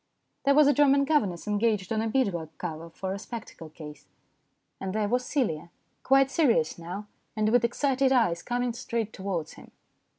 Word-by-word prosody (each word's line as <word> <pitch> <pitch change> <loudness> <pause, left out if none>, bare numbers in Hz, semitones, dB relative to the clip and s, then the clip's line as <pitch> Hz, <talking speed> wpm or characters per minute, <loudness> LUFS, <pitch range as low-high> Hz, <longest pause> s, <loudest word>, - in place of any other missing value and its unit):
There 280 0 +5
was 300 0 +7
a 290 - +5
German 280 -1 +4
governess 210 - 0
engaged 210 -1 0
on 220 - 0
a 225 - -1
bead 240 -4 +1
work 160 -2 -6
cover 165 -1 -6
for 190 +3 -5
a 200 - -5
spectacle 210 -8 -8
case. 150 -1 -11 0.7
And 190 -1 -4
there 215 -1 +1
was 250 +4 +1
Celia, 190 - -1 0.3
quite 270 0 +4
serious 230 - +2
now, 180 +5 -6 0.3
and 215 -1 +1
with 245 +1 +3
excited 265 +2 +1
eyes, 200 -10 +2
coming 245 0 -1
straight 230 -3 -3
towards 185 -5 -4
him. - - -14
220 Hz, 175 wpm, -27 LUFS, 175-255 Hz, 0.7 s, was